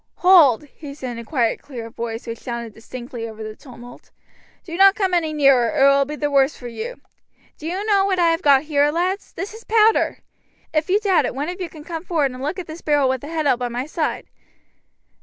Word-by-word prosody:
"Hold!" 330 -10 +6
he 290 0 -11
said 260 -4 -6
in 235 - -7
a - - -7
quiet, 235 -2 0
clear 235 -5 -8
voice, 230 0 -5
which 230 -1 -6
sounded 235 -2 -6
distinctly 235 +1 -8
over 220 0 -9
the 215 0 -7
tumult. 245 -2 -14 0.5
"Do 335 -3 -7
not 390 +2 +6
come 380 -3 0
any 330 -3 +1
nearer, 275 -6 +4
or - - -2
it 275 +1 +7
will 275 0 +3
be 300 +2 -6
the 295 -1 -2
worse 275 +1 +3
for 245 - -8
you. 455 - -6 0.6
Do 315 - -6
you 375 +5 -3
know 405 -2 +3
what 385 -2 0
I 340 -2 +4
have 330 +2 -1
got 280 -4 +5
here, 295 -1 +2
lads? 365 +5 -2
This 400 +2 -6
is 445 +1 -11
powder. 440 0 +3 0.6
If 310 +1 0
you 395 +3 +3
doubt 395 -4 +2
it, - - -6
one 290 +5 -3
of 360 +1 -6
you 355 - -4
can 305 -1 -12
come 325 0 -6
forward 310 -7 0
and 255 0 -9
look 300 +7 -3
at 370 - -5
this 315 +2 -9
barrel 290 -3 +2
with 260 -1 -1
the 290 - -8
head 315 -1 -2
out 255 -4 +2
by 245 - -1
my 245 +2 -4
side. 310 +1 -3
295 Hz, 240 wpm, -21 LUFS, 250-350 Hz, 0.6 s, it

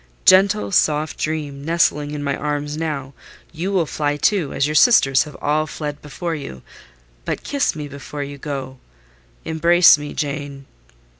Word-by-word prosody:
Gentle, 200 +3 +4
soft 155 -4 +1
dream, 150 -3 -3
nestling 150 -2 +1
in 145 -1 -5
my 140 -1 -1
arms 145 0 -3
now, 150 -4 -4 0.4
you 175 +4 -3
will 185 -4 +2
fly, 145 -1 -2
too, 175 -2 +1
as 140 - 0
your 150 - -2
sisters 145 - +5
have 150 -2 -11
all 155 +1 0
fled 150 -1 -6
before 165 +4 -5
you: 140 - -7 0.6
but - - -4
kiss 280 - 0
me 150 -2 -5
before 140 +1 -7
you 140 0 -8
go—embrace 130 - +1
me, 145 0 -7
Jane." 140 -2 -4
150 Hz, 150 wpm, -20 LUFS, 140-160 Hz, 0.6 s, sisters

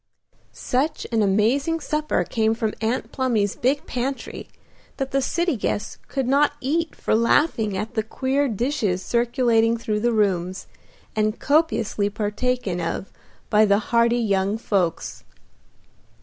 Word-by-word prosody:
Such 285 +5 -1
an 225 -1 +2
amazing 230 +11 +2
supper 305 0 -1
came 220 -1 0
from 220 -1 -1
Aunt 225 +3 -1
Plumy's 230 -7 0
big 275 +4 0
pantry 255 +2 -4 0.5
that 270 -1 -3
the 275 - +1
city 340 +4 0
guests 210 -1 -3
could 270 -3 -2
not 285 +2 +3
eat 320 +5 -1
for - - -1
laughing 225 -2 +2
at 215 +3 -4
the 220 - +1
queer 265 +5 0
dishes 215 -5 -1
circulating 235 -1 +2
through 215 -2 -2
the 240 +2 +1
rooms, 190 -4 0 0.5
and 215 +1 0
copiously 255 -9 +1
partaken 210 -2 -2
of 170 +3 -4 0.4
by 210 0 +6
the 200 -1 +4 0.2
hearty 235 +1 +4
young 200 -2 +1
folks. 190 -7 -1
230 Hz, 135 wpm, -23 LUFS, 210-265 Hz, 0.5 s, by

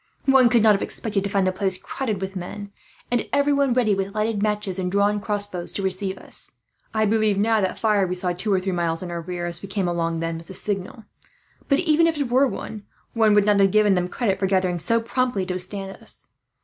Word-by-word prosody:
One 265 -3 +6
could 235 -3 +3
not 215 -1 +7
have 195 - -1
expected 205 -3 -2
to 200 - -2
find 195 -1 +1
the 185 - +2
place 190 0 0
crowded 220 -6 -4
with 190 +1 -4
men, 200 +3 -6 0.4
and 240 -2 0
everyone 280 -1 +2
ready 240 -4 +2
with 195 +1 -3
lighted 215 -1 0
matches 210 -3 -1
and 180 -1 -2
drawn 205 +1 +2
crossbows 205 -4 -2
to 200 - -3
receive 190 0 -1
us. - - -2 0.4
I 220 0 +1
believe 215 -1 +2
now 220 +1 +2
that 190 - +2
that - - -8
fire 210 -4 +2
we 180 - -2
saw, 180 0 0
two 185 +4 -1
or 190 - +3
three 190 +1 -2
miles 170 -1 -1
in 175 - -6
our 170 0 -4
rear 175 +1 -5
as 170 0 -3
we 195 - -8
came 195 -2 -1
along, 165 -1 -1
was 165 0 -4
a 190 - -4
signal; 205 +4 -3 0.7
but 275 - +4
even 330 -1 +3
if 325 -2 0
it 275 -5 -2
were, 265 +3 +4
one 215 -4 -6 0.3
would 215 -3 +4
not 205 -1 +3
have 195 0 +5
given 210 0 +4
them 180 -1 0
credit 200 -4 -1
for 195 - +1
gathering 185 -2 +1
so 230 +8 +2
promptly 235 -3 -1
to 185 - -3
withstand 195 +2 -3
us. - - -6
200 Hz, 235 wpm, -23 LUFS, 185-220 Hz, 0.7 s, not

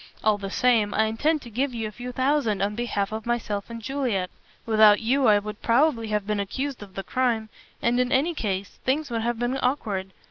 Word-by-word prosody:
"All 215 -1 +3
the 195 -1 -5
same, 225 -2 +2
I 220 - +4
intend 285 +8 0
to 235 - -11
give 255 +3 -1
you 225 -2 -2
a - - -7
few 245 +3 -7
thousands 255 -6 +1
on 205 +1 0
behalf 210 -3 -2
of 220 +1 -5
myself 215 -4 -2
and 230 0 -6
Juliet. 245 -8 -1 0.3
Without 215 -2 +6
you 260 +4 +2
I 210 -1 +6
would 210 +1 -5
probably 240 -1 +2
have 210 -2 -1
been 210 0 -1
accused 260 +7 -3
of 195 -2 -11
the 195 - -4
crime. 235 -3 0 0.3
And, 240 +1 +2
in 250 0 +1
any 295 +5 +2
case, 200 - -3
things 280 +2 0
would 230 -1 -1
have 235 +1 -1
been 245 +3 -1
awkward. 205 -8 -1
230 Hz, 215 wpm, -25 LUFS, 210-255 Hz, 0.3 s, Without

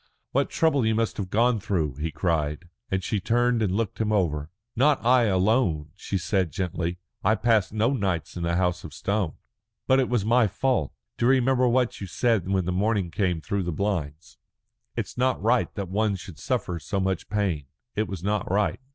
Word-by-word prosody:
"What - - +1
trouble 155 -5 +2
you 110 0 +2
must 115 0 0
have 95 -3 -3
gone 115 +2 +3
through!" 80 - -1
he 80 +2 -2
cried, 75 +1 -1 0.2
and 95 -1 -1
she 105 +2 -1
turned 120 +3 +2
and 95 -3 +1
looked 110 0 -2
him 110 -1 0
over. 80 -7 0 0.3
"Not 140 -2 +3
I 125 0 +5
alone," 95 - +1
she 100 - -3
said 95 0 0
gently. 90 -2 -2 0.3
"I 110 - +4
passed 110 -4 +2
no 110 +5 +1
nights 95 - -2
in 90 - -4
the 85 0 0
House 90 -1 0
of 75 -2 -9
Stone." 100 -5 -1 0.5
"But 130 0 +4
it 130 - +1
was 120 -5 +1
my 115 0 +4
fault. 125 - 0 0.3
Do 120 - +3
you 130 - +6
remember 130 -1 +3
what 125 -2 +1
you 100 - -4
said 105 0 +1
when 95 -2 +1
the 90 - -1
morning 100 -1 0
came 90 -5 0
through 100 +3 -2
the 90 -1 -2
blinds? 85 -2 -3 0.6
'It's - - -4
not 130 0 +2
right 120 +4 +2
that 100 -3 -3
one 105 +2 +1
should 90 -4 -10
suffer 90 -6 -2
so 100 - -3
much 95 -2 -1
pain.' 95 -10 -1 0.3
It 110 0 0
was 90 -2 -6
not 105 +1 -1
right." 105 +1 +1
100 Hz, 200 wpm, -26 LUFS, 90-115 Hz, 0.6 s, you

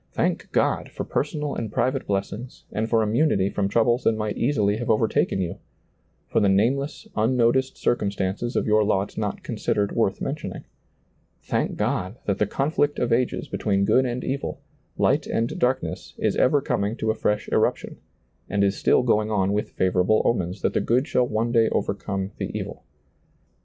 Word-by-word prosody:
Thank - - -1
God - - +1
for - - -5
personal 150 0 -2
and 110 -3 -4
private 130 +4 0
blessings 100 +5 -4
and 110 +2 -2
for 115 -1 +3
immunity 105 -3 +2
from 100 -1 0
troubles 120 +4 +2
that - - +3
might 105 -1 -2
easily 110 -6 +1
have 120 +1 -4
overtaken 110 -3 +2
you; 85 -2 -3 0.7
for - - +1
the 100 - +3
nameless, 130 +9 +1
unnoticed 125 +3 +2
circumstances 100 +1 -1
of - - +1
your 110 0 +4
lot 100 -1 0
not - - -3
considered 100 -1 -1
worth 100 -4 0
mentioning. 145 +2 -4 0.8
Thank - - -1
God 95 +6 -1
that 100 - -1
the 105 - +2
conflict 145 +4 0
of 120 -1 +1
ages 125 +1 0
between 100 -2 0
good 130 +5 +3
and 125 +1 -3
evil, 140 +1 -3 0.4
light - - +2
and 115 +1 -1
darkness, 130 +1 -1
is - - 0
ever 140 +2 +3
coming 105 -3 -1
to 110 -1 0
a - - 0
fresh 105 -1 -1
eruption, - - 0 0.5
and 100 0 +1
is 100 0 +2
still - - +3
going 110 -3 +2
on 100 -2 +1
with 105 - -1
favorable 95 +3 +2
omens 95 -4 -1
that - - +1
the - - +1
good 125 +5 +1
shall 125 -5 +2
one 115 +1 -1
day 115 -2 +4
overcome 100 -1 -2
the - - -2
evil. - - -6
110 Hz, 175 wpm, -24 LUFS, 100-125 Hz, 0.8 s, your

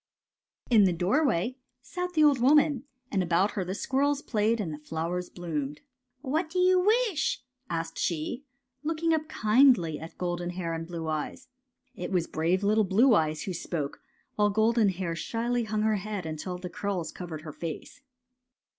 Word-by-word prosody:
In 215 -4 +7
the 180 - +3
doorway 225 - +1 0.3
sat 360 0 -4
the 310 -2 +4
old 290 -4 +5
woman, 285 0 +4 0.3
and 195 - +1
about 180 +3 +2
her 195 - -2
the 185 +2 -4
squirrels 280 +5 0
played 220 0 +1
and 170 -7 -2
the 150 - -7
flowers 165 +4 -3
bloomed. 150 -5 -4 0.2
'' 250 +1 -49
What 310 +6 -1
do 360 - -5
you 365 0 +5
wish'? 415 - +1
'' - - -56
asked 165 -1 -3
she, 170 - -2 0.4
look 320 +1 -3
ing 330 -1 +4
up 310 -1 0
kindly 215 - +4
at 160 +1 -10
Golden 175 -1 -2
Hair 175 -2 -3
and 165 0 -4
Blue 165 -2 -5
Eyes. 155 - -4 0.4
It 180 -6 -6
was 180 -3 +1
brave 170 +5 0
little 215 +2 +3
Blue 220 +7 +4
Eyes 155 -4 +1
who 190 - -3
spoke, 160 -4 -4 0.4
while 210 0 +4
Golden 220 +1 +3
Hair 180 -2 -3
shyly 235 +4 -1
hung 215 0 -1
her 215 -1 +2
head 200 -2 -4
until 160 +3 -4
the 180 0 -6
curls 180 -2 -3
covered 165 -4 -7
her 155 -2 -7
face. 165 - -7
200 Hz, 180 wpm, -28 LUFS, 170-255 Hz, 0.4 s, In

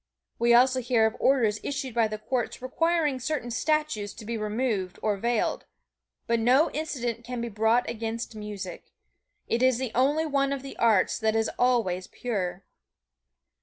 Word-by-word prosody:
We 235 +1 +3
also 255 +1 +4
hear 235 -2 +3
of 220 +1 0
orders 230 -6 +3
issued 275 -3 -4
by 230 -1 +3
the 215 0 -5
courts 240 +2 -3
requiring 300 +1 0
certain 255 -2 -3
statues 290 -5 -1
to 225 - -10
be 235 +2 -3
removed 215 -3 -2
or 210 -1 +2
veiled, 235 +3 -1 0.6
but 235 0 +1
no 255 +7 +4
indictment 245 -7 -3
can 245 +1 -5
be 235 0 -3
brought 220 +3 +2
against 230 0 -4
music. 205 -4 -7 0.6
It 230 - 0
is 255 -2 +4
the 255 -2 -3
only 290 +6 +2
one 275 -2 +1
of 275 -1 -5
the 275 - -8
arts 220 -5 +3
that 220 -1 +1
is 225 0 +1
always 225 -8 +1
pure. 195 -6 -3
235 Hz, 165 wpm, -27 LUFS, 220-260 Hz, 0.6 s, also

